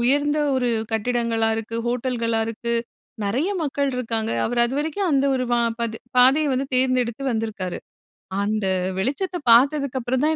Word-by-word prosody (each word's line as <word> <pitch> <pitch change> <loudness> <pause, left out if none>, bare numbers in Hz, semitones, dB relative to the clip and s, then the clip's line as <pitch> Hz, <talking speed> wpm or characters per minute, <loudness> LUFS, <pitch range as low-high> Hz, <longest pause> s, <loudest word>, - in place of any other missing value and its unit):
உயர்ந்த 290 +4 +2 0.2
ஒரு 250 -1 +1 0.2
கட்டிடங்களா 230 0 0
இருக்கு, 225 +1 -4
ஹோட்டல்களா 240 -2 0
இருக்கு. 235 +1 -3 0.5
நெறைய 260 - 0
மக்கள் 280 -1 0
இருக்காங்க. 225 -3 -2 0.2
அவரு 240 +1 0
அதுவரைக்கும் 310 +8 -1
அந்த 275 0 +3
ஒரு 255 - 0
வா 240 - +3 0.2
பது 230 -1 -2 0.2
பாதைய 275 +4 +5
வந்து 265 +1 -1
தேர்ந்தெடுத்து 255 -1 +1
வந்திருக்காரு. 215 -5 -3 0.7
அந்த 215 0 -1 0.3
வெளிச்சத்த 355 - -1
பார்த்ததுக்கப்புறம் 260 0 +3
தான், 315 +1 +2
250 Hz, 135 wpm, -23 LUFS, 230-275 Hz, 0.7 s, பாதைய